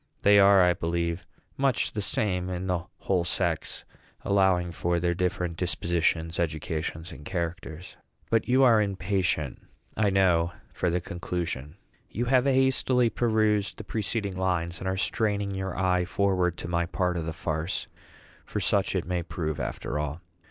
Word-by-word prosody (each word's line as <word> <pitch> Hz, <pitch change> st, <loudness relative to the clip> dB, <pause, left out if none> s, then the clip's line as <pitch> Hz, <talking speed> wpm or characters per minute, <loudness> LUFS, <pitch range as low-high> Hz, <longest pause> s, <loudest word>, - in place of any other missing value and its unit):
They 100 Hz, 0 st, +7 dB
are, 100 Hz, -1 st, +7 dB
I 90 Hz, 0 st, +4 dB
believe, 85 Hz, 0 st, -2 dB, 0.3 s
much 135 Hz, -3 st, +1 dB
the 105 Hz, -, -3 dB
same 95 Hz, -3 st, 0 dB
in 90 Hz, 0 st, -3 dB
the 90 Hz, -2 st, -1 dB, 0.2 s
whole 90 Hz, -3 st, +1 dB
sex, 85 Hz, -2 st, -1 dB, 0.4 s
allowing 95 Hz, -3 st, +3 dB
for 85 Hz, +1 st, 0 dB
their 85 Hz, 0 st, +1 dB
different 90 Hz, -1 st, -1 dB
dispositions, 85 Hz, -2 st, 0 dB
educations, 80 Hz, +1 st, -3 dB
and 80 Hz, -, -10 dB
characters; 85 Hz, 0 st, -5 dB, 0.3 s
but 115 Hz, -1 st, +2 dB
you 130 Hz, +2 st, +4 dB
are 115 Hz, -4 st, +6 dB
impatient, 95 Hz, -7 st, -1 dB, 0.3 s
I 105 Hz, -2 st, +2 dB
know, 90 Hz, -3 st, +3 dB, 0.2 s
for 90 Hz, -, 0 dB
the 90 Hz, +1 st, 0 dB
conclusion. 85 Hz, -4 st, -4 dB, 0.3 s
You 120 Hz, +4 st, -2 dB
have 130 Hz, +1 st, +3 dB
hastily 130 Hz, -2 st, +3 dB
perused 110 Hz, -3 st, +1 dB
the -, -, -7 dB
preceding 105 Hz, -2 st, -2 dB
lines, 90 Hz, -2 st, -1 dB
and 95 Hz, -, -4 dB
are 95 Hz, 0 st, -1 dB
straining 100 Hz, 0 st, 0 dB
your 95 Hz, -1 st, -4 dB
eye 90 Hz, -1 st, +2 dB
forward 90 Hz, -2 st, +1 dB
to -, -, -6 dB
my 85 Hz, 0 st, 0 dB
part 90 Hz, 0 st, 0 dB
of 85 Hz, -2 st, -3 dB
the -, -, -1 dB
farce; 80 Hz, +1 st, -3 dB, 0.6 s
for -, -, -4 dB
such -, -, +1 dB
it -, -, 0 dB
may 90 Hz, 0 st, -1 dB
prove, 80 Hz, -3 st, -4 dB
after 65 Hz, +3 st, -3 dB
all. 75 Hz, +1 st, -3 dB
90 Hz, 160 wpm, -27 LUFS, 85-100 Hz, 0.6 s, They